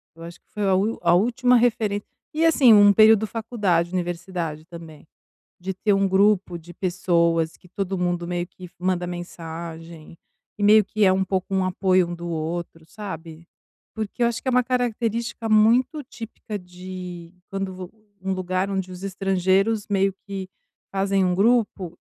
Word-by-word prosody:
Eu 165 - -12
acho 170 +1 -10
que - - -53
foi 210 - -4
a 190 - +3
última 210 +4 0
a - - +6
última 245 +6 +3
referência 225 -4 +1 0.3
e, 320 +2 +1
assim, 280 -8 +6
um 205 -1 +7
período 215 +1 +6
de - - -12
faculdade, 205 -7 0
universidade 175 -3 -4
também, 165 -3 -12 0.5
de 190 +1 -4
ter 205 +2 +1
um 195 0 +2
grupo 195 -1 +2
de 170 +1 -13
pessoas 170 -3 0
que 180 - -21
todo 190 +1 -3
mundo 175 -1 -1
meio 175 0 -2
que 180 0 -12
manda 180 -1 -1
mensagem, 165 -2 -8 0.4
e - - -4
meio 215 +1 +7
que 210 +2 0
é 190 - +5
um 190 0 +1
pouco 190 0 -3
um 190 -1 +2
apoio 185 -1 +2
um 175 - -4
do 175 0 -7
outro, 165 0 -4
sabe? 170 -6 -8 0.5
Porque 220 +2 -4
eu - - +5
acho 230 -1 -3
que - - -4
é - - +3
uma 250 0 +3
característica 235 -2 -2
muito 235 +7 +3
típica 225 -4 -8
de 180 -1 -9 0.2
quando 195 -1 -3
vo 185 -1 -8 0.3
um 190 0 -1
lugar 185 +1 -2
onde 190 -1 -3
os 180 +1 -9
estrangeiros 195 +2 +1
meio 195 -1 +1
que 195 -2 -6 0.4
fazem 195 0 +1
um 180 -1 +1
grupo 200 -4 +1
190 Hz, 175 wpm, -23 LUFS, 175-210 Hz, 0.5 s, um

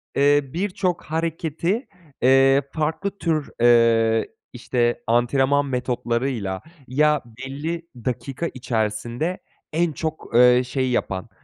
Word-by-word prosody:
eee, 145 +1 +4
birçok 180 -1 -1
hareketi, 165 - -2 0.3
eee, 135 +2 +5
farklı 160 +6 -2
tür, 155 -5 -1
eee, 115 -1 +4 0.2
işte, 120 0 -1
antrenman 135 +4 +2
metotlarıyla 120 -5 -2 0.3
ya 150 +2 +2
belli 140 +8 -6
dakika 130 +6 -3
içerisinde 120 - -2 0.4
en 170 +1 +1
çok, 160 +1 -5
eee, 125 +1 +7
şeyi 130 0 -1
yapan, 100 -3 -2
135 Hz, 100 wpm, -23 LUFS, 120-160 Hz, 0.4 s, eee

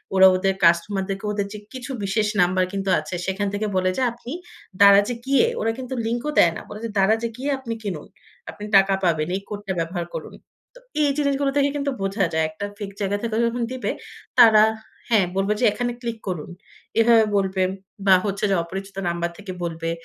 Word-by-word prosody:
ওরা 190 0 +8
ওদের 195 +1 +1
কাস্টমার 170 +4 +3
দেরকে 195 +1 -4
ওদের 205 -1 -1
যে 210 - -7
কিছু 260 +1 -7
বিশেষ 210 +2 +1
নাম্বার 185 +1 +3
কিন্তু 195 0 -2
আছে। 155 +3 -6 0.2
এখান 205 +1 -2
থেকে 210 +1 -1
বলে 185 0 +2
যে - - 0
"আপনি 240 +1 -10 0.5
দারাজে 200 +3 +7
গিয়ে" 275 - +4 0.2
ওরা 225 - +1
কিন্তু 260 0 -6
লিঙ্ক 235 +1 -1
ও - - -1
দেয় 170 - +6
না। - - -7
বলে 210 - -8
যে - - -3
"দারাজে 220 +4 +2
গিয়ে 270 +3 -3
আপনি 235 -3 -5
কিনুন। 175 -7 -4 0.4
আপনি 205 - -9
টাকা 195 0 +4
পাবেন। 160 -3 +1
এই 195 - -3
কোডটা 205 -2 -4
ব্যবহার 170 +1 -3
করুন।" - - -6 0.4
তো - - -13 0.2
এই 290 - +3
জিনিসগুলো 280 -1 +1
থেকে 285 0 +3
কিন্তু 280 -1 -1
বোঝা 195 +1 0
যায়। 160 0 +2
একটা 160 +6 -6
ফেক 205 -2 -6
জায়গা 200 0 0
থেকে 230 -2 -2
যখন 235 +1 -1
দিবে, 255 0 -2 0.5
তারা 220 -3 +8 0.5
হ্যাঁ, 215 -5 +4
বলবে 195 +2 +2
যে 250 - +3
এখানে 245 +3 -2
ক্লিক 235 -2 -4
করুন। 175 -5 -4 0.5
এভাবে 225 0 +6
বলবে 190 -1 0 0.5
বা 190 - +8
হচ্ছে 200 0 -1
যে - - +3
অপরিচিত 195 +3 -8
নাম্বার 170 0 -1
থেকে 205 -2 -8
বলবে। 165 -1 -3
200 Hz, 200 wpm, -23 LUFS, 190-235 Hz, 0.5 s, ওরা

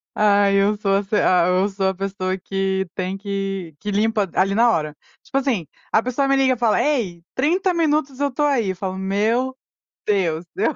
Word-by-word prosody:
Ai, 200 -1 +3
eu 205 +2 +2
sou 195 -1 +1
ess 200 0 -5
ah, 180 -4 +3
eu 185 +2 +2
sou 195 -1 0
a - - -1
pessoa 190 -1 -3
que 190 0 -2
tem 185 +1 -3
que 195 -4 -4
que 205 - -4
limpa 215 0 +1
d 180 - -13
ali 195 +1 +2
na 235 +1 +5
hora. 155 -5 -1 0.3
Tipo - - -3
assim, 250 - 0 0.2
a 220 - +4
pessoa 255 +3 -1
me 275 - +3
liga 265 -1 +3
e - - -5
fala: 230 -2 +2
"Ei, 205 - -1
30 355 +7 +1
minutos 300 -5 0
eu 285 0 +1
estou 295 +3 -1
aí. 245 -8 +1
Eu - - -6
falo: 190 +1 -4
"Meu 220 +7 0 0.5
Deus, 175 -5 0
eu" - - 0
200 Hz, 205 wpm, -21 LUFS, 190-255 Hz, 0.5 s, na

